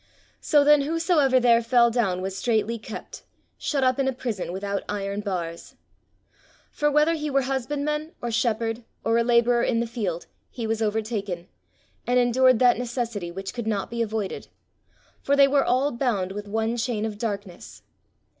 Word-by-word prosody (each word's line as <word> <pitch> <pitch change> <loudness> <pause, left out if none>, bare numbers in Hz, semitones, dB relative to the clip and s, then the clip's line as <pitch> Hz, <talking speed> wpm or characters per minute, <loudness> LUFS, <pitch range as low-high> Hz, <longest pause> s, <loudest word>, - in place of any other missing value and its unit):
"So 295 -2 +3
then 295 0 +6
whosoever 310 -3 +2
there 235 -1 +4
fell 235 0 +4
down 195 -6 0
was 190 0 -4
straitly 225 +1 0
kept, 215 - -9 0.4
shut 280 -3 -1
up 255 +1 +2
in 270 - +1
a 265 - +1
prison 230 -9 -4
without 200 +2 -3
iron 200 0 -3
bars. 175 -5 -5 1.0
"For 295 - +1
whether 300 +3 +3
he 305 -2 -3
were 275 -1 +2
husbandman, 290 +4 -2
or 240 - -4
shepherd, 230 0 -1 0.2
or 230 +1 +2
a - - +3
labourer 240 0 +3
in 230 -1 +1
the 235 - 0
field, 210 -8 -4 0.2
he 235 - -5
was 225 0 -1
overtaken, 210 -5 -2 0.6
and 245 +1 +2
endured 250 +1 +4
that 245 0 +4
necessity, 235 -6 -3
which 190 +2 -6
could 240 -3 -5
not 205 -2 -2
be 235 0 -2
avoided: 215 -3 -3 0.7
for 280 - +2
they 280 -1 +6
were 275 0 +3
all 265 +4 +1
bound 235 -7 -1
with 205 +1 -6
one 225 +3 -1
chain 230 -2 -1
of 210 -2 -5
darkness. 200 -5 -6
235 Hz, 170 wpm, -25 LUFS, 210-260 Hz, 1.0 s, then